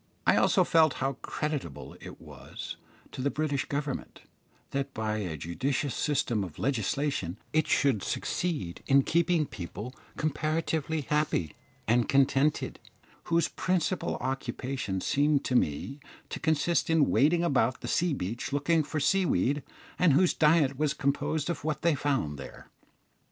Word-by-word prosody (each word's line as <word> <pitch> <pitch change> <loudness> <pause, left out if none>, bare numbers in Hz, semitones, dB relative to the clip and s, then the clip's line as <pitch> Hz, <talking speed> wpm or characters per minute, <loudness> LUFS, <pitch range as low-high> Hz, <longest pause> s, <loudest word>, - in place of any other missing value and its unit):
I - - +5
also 185 - +4
felt 160 -4 +4
how 135 +1 -1
creditable 135 - -4
it - - -10
was - - -9 0.4
to - - -6
the 140 - +1
British 145 -1 -1
Government, 140 -1 -4 0.5
that 140 0 -3
by 110 -1 -1
a 90 -7 -3
judicious 130 - -2
system 130 -8 0
of 85 -5 -8
legislation 130 - -1 0.2
it 155 0 +2
should 135 -8 +2
succeed 145 - -2
in 135 0 +5
keeping 170 0 +2
people 105 +3 -7 0.2
comparatively 155 +1 -1
happy 150 - 0 0.3
and 120 +1 +2
contented, 140 +2 +2 0.5
whose 170 0 +2
principal 185 0 -1
occupation 125 -5 -3
seemed 145 +4 +2
to 130 - 0
me 125 - 0 0.3
to - - -5
consist 160 +2 +1
in 160 -3 +3
wading 165 +5 +3
about 130 -6 +1
the - - -5
sea 175 -2 +1
beach 115 +5 -4
looking 150 +4 +2
for 155 +1 -3
sea 180 +6 +2
weed, 140 - +1 0.4
and 175 -5 +5
whose 180 +5 +4
diet 150 -4 +3
was 150 -1 +1
composed 145 +1 0
of 170 - -3
what 155 -1 -2
they 170 -1 +4
found 130 - -1
there. 65 - -11
140 Hz, 145 wpm, -29 LUFS, 125-155 Hz, 0.5 s, I